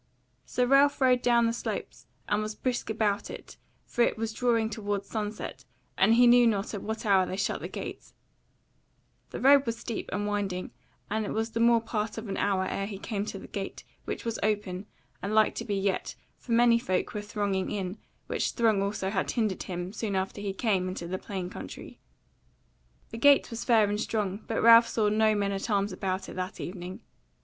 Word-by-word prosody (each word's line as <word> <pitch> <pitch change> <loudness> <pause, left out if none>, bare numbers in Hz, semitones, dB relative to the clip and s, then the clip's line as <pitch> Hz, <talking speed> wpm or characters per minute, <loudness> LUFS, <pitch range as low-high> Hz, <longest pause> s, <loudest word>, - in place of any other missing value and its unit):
So 250 - +1
Ralph 275 +3 +4
rode 255 -2 +4
down 235 -1 +4
the 230 - +1
slopes 235 - -5 0.2
and 205 +1 +1
was 215 0 -4
brisk 250 -1 -2
about 215 -1 0
it, - - -10 0.3
for - - -2
it 235 - +3
was 225 0 -3
drawing 230 -2 +2
toward 205 -2 -3
sunset, 210 0 -5 0.3
and 215 +4 +4
he 245 +1 +6
knew 240 0 +7
not 205 -1 0
at 205 - -4
what 220 +1 -4
hour 190 -3 +4
they 185 - -4
shut 200 - -1
their - - -6
gates. - - -8 1.1
The - - -6
road 275 0 +6
was 230 0 -1
steep 230 - -5
and 205 +2 -1
winding, 200 -3 -2 0.4
and 220 +1 0
it 205 - -3
was 225 +1 -1
the 230 - -2
more 235 0 +5
part 220 -1 -3
of 225 0 -5
an 195 - -3
hour 195 -2 +1
ere 195 +1 -2
he 200 -2 -6
came 205 0 -3
to 205 - -5
the - - -10
gate, 195 -1 -6 0.2
which - - -5
was 230 -1 -2
open, 205 -2 -1 0.3
and 205 +2 -2
like 215 -1 +4
to - - -5
be 205 - -1
yet, 195 0 -1 0.2
for 235 - -4
many 235 0 +5
folk 185 -1 -1
were 210 - -3
thronging 205 -2 -2
in, 195 0 -4 0.3
which - - -1
throng 220 -4 +2
also 200 -1 -2
had 190 -2 -1
hindered 215 -6 0
him 180 +1 -5
soon 215 -3 -3
after 190 +2 -2
he 200 -1 -2
came 195 -2 0
into 185 -2 -5
the 185 +2 -3
plain 190 -3 -5
country. 180 - -9 1.1
The 225 - -6
gate 285 0 +5
was 230 0 -4
fair 225 -4 +4
and 205 +1 -1
strong, 210 -2 -2
but 225 - -1
Ralph 230 0 +8
saw 215 -3 +1
no 215 0 +3
men 200 -1 0
at 195 +3 -3
arms 200 -1 +1
about 185 0 -3
it - - -8
that 185 0 -4
evening. 180 0 -6
210 Hz, 205 wpm, -28 LUFS, 195-230 Hz, 1.1 s, Ralph